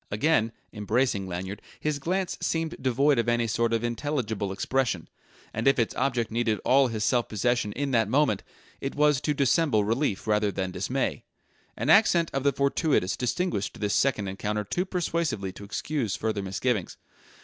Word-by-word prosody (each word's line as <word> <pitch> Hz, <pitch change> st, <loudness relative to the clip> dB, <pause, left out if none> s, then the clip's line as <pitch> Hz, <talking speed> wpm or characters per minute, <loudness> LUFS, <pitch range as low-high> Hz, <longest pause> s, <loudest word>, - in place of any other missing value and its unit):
Again, 115 Hz, 0 st, +2 dB, 0.2 s
embracing 105 Hz, -1 st, 0 dB
Lanyard, 95 Hz, +3 st, -5 dB, 0.2 s
his 150 Hz, -2 st, -1 dB
glance 185 Hz, +5 st, -1 dB
seemed 165 Hz, -1 st, -1 dB
devoid 135 Hz, +1 st, +3 dB
of 115 Hz, -, +1 dB
any 120 Hz, 0 st, +2 dB
sort 115 Hz, +1 st, 0 dB
of 115 Hz, 0 st, 0 dB
intelligible 120 Hz, -5 st, -2 dB
expression; 110 Hz, -2 st, -1 dB, 0.5 s
and 110 Hz, +4 st, -1 dB
if 135 Hz, -, +5 dB
its 115 Hz, -3 st, 0 dB
object 125 Hz, -4 st, 0 dB
needed 115 Hz, -2 st, 0 dB
all 135 Hz, +1 st, +5 dB
his 110 Hz, -3 st, -3 dB
self 120 Hz, +1 st, +1 dB
possession 115 Hz, +1 st, 0 dB
in 140 Hz, +1 st, -2 dB
that 115 Hz, -4 st, +2 dB
moment, 130 Hz, -5 st, +2 dB, 0.4 s
it 135 Hz, -, -4 dB
was 150 Hz, -2 st, +3 dB
to 150 Hz, -1 st, 0 dB
dissemble 140 Hz, -4 st, +3 dB
relief 115 Hz, -1 st, -1 dB
rather 105 Hz, -1 st, +2 dB
than 95 Hz, -1 st, -3 dB
dismay. -, -, -2 dB, 0.5 s
An -, -, +1 dB
accent 175 Hz, -6 st, +5 dB
of 135 Hz, -, 0 dB
the 140 Hz, +1 st, +3 dB
fortuitous 140 Hz, -, +1 dB
distinguished 125 Hz, -, -2 dB
this 105 Hz, -1 st, 0 dB
second 120 Hz, -7 st, +1 dB
encounter 105 Hz, +2 st, -2 dB
too 175 Hz, -, -2 dB
persuasively 170 Hz, -, -1 dB
to 100 Hz, -, -11 dB
excuse 110 Hz, +1 st, -2 dB
further 110 Hz, -2 st, -2 dB
misgivings. 100 Hz, +1 st, -2 dB
120 Hz, 165 wpm, -27 LUFS, 105-140 Hz, 0.5 s, if